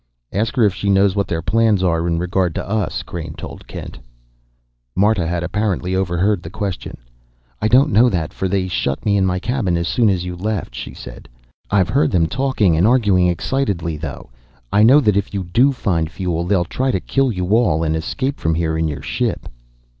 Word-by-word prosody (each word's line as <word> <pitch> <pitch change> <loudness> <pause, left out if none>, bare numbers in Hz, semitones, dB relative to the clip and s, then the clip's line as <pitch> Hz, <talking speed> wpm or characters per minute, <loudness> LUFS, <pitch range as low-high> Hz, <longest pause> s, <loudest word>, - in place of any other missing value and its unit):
"Ask 110 +6 -1
her 125 - +3
if 100 -3 +3
she 100 - -2
knows 100 0 +3
what 100 -1 0
their 80 -1 -3
plans 110 -3 +2
are 85 -2 +1
in 85 -1 0
regard 90 -1 0
to - - -4
us," 105 +1 -2
Crain - - -7
told - - -9
Kent. - - -8 1.0
Marta 100 -3 +2
had 85 0 -2
apparently 95 -1 -1
overheard 95 +1 +1
the 80 - -8
question. 100 -2 -5 0.6
"I - - +2
don't 135 +6 +4
know 120 +3 +5
that, 85 -7 -2
for 95 - -2
they 95 0 0
shut 70 -6 -2
me 105 -1 +2
in 95 -1 +2
my 90 0 0
cabin 100 -4 -1
as 85 0 -2
soon 120 -4 +2
as 90 -2 0
you 90 0 -5
left," 100 - -3
she - - -7
said. - - -11 0.4
"I've 95 -4 +2
heard 140 +7 +2
them 85 -3 +2
talking 110 -4 +1
and 85 +6 +3
arguing 105 -7 +3
excitedly, 90 - -1
though. 75 -5 -7 0.4
I 105 - +4
know 130 +7 +7
that 105 -6 +2
if 100 0 -2
you 95 - -1
do 120 +11 +3
find 85 -11 -1
fuel, 85 -2 -3
they'll 90 -1 +1
try 130 +9 -2
to 95 - +1
kill 135 +6 0
you 90 -3 -3
all 90 -9 +2
and 80 0 0
escape 130 - -3
from 80 0 0
here 80 -1 -1
in 80 - +1
your 75 -2 -5
ship." - - -2
95 Hz, 205 wpm, -19 LUFS, 85-110 Hz, 1.0 s, know